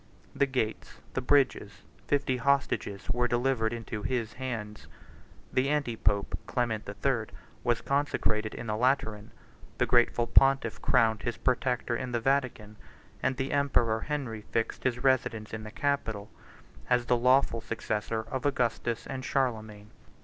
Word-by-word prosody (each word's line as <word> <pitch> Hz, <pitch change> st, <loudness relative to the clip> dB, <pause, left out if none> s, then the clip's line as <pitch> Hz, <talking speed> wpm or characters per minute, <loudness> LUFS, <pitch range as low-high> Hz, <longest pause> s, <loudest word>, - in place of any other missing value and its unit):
The 140 Hz, -, +3 dB
gates, 125 Hz, -5 st, -3 dB
the 130 Hz, -, -1 dB
bridges, 125 Hz, -7 st, +1 dB
and -, -, -28 dB
fifty 140 Hz, -3 st, +1 dB
hostages, 135 Hz, -6 st, 0 dB
were 120 Hz, +1 st, +1 dB
delivered 120 Hz, -2 st, +1 dB
into 115 Hz, -2 st, -5 dB
his 115 Hz, -2 st, -2 dB
hands: 115 Hz, -5 st, -5 dB, 0.7 s
the 130 Hz, +2 st, +2 dB
anti 145 Hz, -6 st, 0 dB
pope, 100 Hz, -2 st, 0 dB
Clement 115 Hz, -3 st, -1 dB
the 100 Hz, -, -6 dB
Third, 115 Hz, 0 st, -1 dB, 0.3 s
was 120 Hz, -1 st, +1 dB
consecrated 110 Hz, -6 st, 0 dB
in -, -, -6 dB
the 105 Hz, -1 st, -1 dB
Lateran: 110 Hz, -3 st, 0 dB, 0.5 s
the -, -, +3 dB
grateful 120 Hz, -1 st, +3 dB
pontiff 135 Hz, -2 st, +3 dB
crowned 110 Hz, -3 st, +3 dB
his 120 Hz, -, -3 dB
protector 125 Hz, -2 st, 0 dB
in 125 Hz, +1 st, -4 dB
the 120 Hz, -, +1 dB
Vatican; 120 Hz, -5 st, -1 dB, 0.4 s
and 130 Hz, -, 0 dB
the 135 Hz, +1 st, -2 dB
emperor 120 Hz, -6 st, +2 dB
Henry 130 Hz, -7 st, -3 dB
fixed 115 Hz, +2 st, -1 dB
his 125 Hz, -1 st, 0 dB
residence 120 Hz, -5 st, +1 dB
in 110 Hz, -, -4 dB
the 110 Hz, -, -7 dB
Capitol, 115 Hz, -6 st, -2 dB, 0.6 s
as 125 Hz, -1 st, +3 dB
the 125 Hz, -, +3 dB
lawful 125 Hz, -1 st, +3 dB
successor 110 Hz, 0 st, -2 dB
of 125 Hz, +3 st, -4 dB
Augustus 120 Hz, -3 st, -1 dB
and 130 Hz, -1 st, -5 dB
Charlemagne. 110 Hz, -6 st, -2 dB
120 Hz, 150 wpm, -29 LUFS, 110-130 Hz, 0.7 s, The